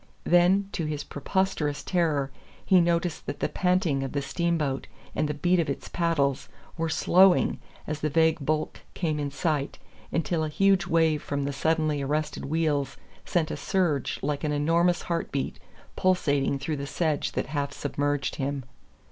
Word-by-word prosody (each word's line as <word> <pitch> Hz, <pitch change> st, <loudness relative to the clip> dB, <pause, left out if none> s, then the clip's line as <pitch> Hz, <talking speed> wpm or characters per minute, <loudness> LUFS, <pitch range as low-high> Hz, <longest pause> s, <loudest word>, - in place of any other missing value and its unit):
Then, 180 Hz, +3 st, +4 dB
to 165 Hz, -, -2 dB
his 150 Hz, -1 st, -3 dB
preposterous 150 Hz, 0 st, -1 dB
terror, 155 Hz, -7 st, 0 dB, 0.3 s
he 185 Hz, -2 st, +6 dB
noticed 170 Hz, 0 st, 0 dB
that 145 Hz, 0 st, -4 dB
the -, -, +1 dB
panting 180 Hz, -6 st, +1 dB
of 135 Hz, -, -4 dB
the 140 Hz, -, 0 dB
steamboat 155 Hz, -3 st, -1 dB, 0.3 s
and 155 Hz, -, +1 dB
the 150 Hz, -, -2 dB
beat 175 Hz, +4 st, +2 dB
of 160 Hz, -, 0 dB
its 140 Hz, -, -4 dB
paddles 150 Hz, -6 st, 0 dB, 0.3 s
were 165 Hz, -1 st, -1 dB
"slowing" 180 Hz, +3 st, +4 dB, 0.3 s
as 155 Hz, -1 st, -4 dB
the 155 Hz, -, 0 dB
vague 160 Hz, 0 st, +2 dB
bulk 155 Hz, +2 st, -1 dB, 0.2 s
came 155 Hz, -4 st, -1 dB
in 145 Hz, -1 st, -1 dB
sight, 145 Hz, 0 st, -1 dB, 0.3 s
until 165 Hz, 0 st, 0 dB
a 155 Hz, -, -1 dB
huge 195 Hz, +2 st, +3 dB
wave 160 Hz, -3 st, +2 dB
from 145 Hz, -1 st, -2 dB
the 140 Hz, 0 st, -2 dB
suddenly 155 Hz, 0 st, +1 dB
arrested 150 Hz, +1 st, -2 dB
wheels 150 Hz, -2 st, 0 dB, 0.3 s
sent 165 Hz, -3 st, 0 dB
a -, -, -2 dB
surge 155 Hz, -4 st, 0 dB
like 145 Hz, +1 st, -1 dB
an 150 Hz, -, 0 dB
enormous 165 Hz, +4 st, +2 dB
heartbeat 165 Hz, -5 st, -2 dB, 0.4 s
pulsating 145 Hz, -7 st, +2 dB
through 145 Hz, +2 st, -3 dB
the 140 Hz, 0 st, -4 dB
sedge 155 Hz, 0 st, -1 dB
that -, -, -1 dB
half 140 Hz, -1 st, -1 dB
submerged 145 Hz, 0 st, -2 dB
him. 140 Hz, -1 st, -2 dB
155 Hz, 165 wpm, -27 LUFS, 145-170 Hz, 0.4 s, he